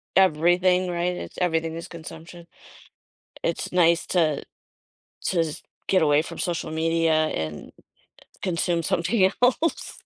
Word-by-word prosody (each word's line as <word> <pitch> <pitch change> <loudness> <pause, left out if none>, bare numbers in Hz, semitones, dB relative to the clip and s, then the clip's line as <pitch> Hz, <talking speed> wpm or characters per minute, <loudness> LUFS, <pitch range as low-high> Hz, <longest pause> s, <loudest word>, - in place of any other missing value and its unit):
everything, 180 +1 +3
right? 175 +1 -1
It's - - -8
everything 165 -2 0
is 165 - -7
consumption. 165 +1 -10 1.0
It's - - -2
nice 170 -1 +3
to 160 -5 +1 0.8
to - - 0
just 155 -2 -6 0.2
get 185 -3 +3
away 150 0 +4
from - - -8
social 170 -3 -2
media 165 0 +1
and 80 - -5 0.7
consume 170 -1 0
something 185 +4 +2
else. 260 +7 +1
170 Hz, 120 wpm, -24 LUFS, 160-180 Hz, 1.0 s, away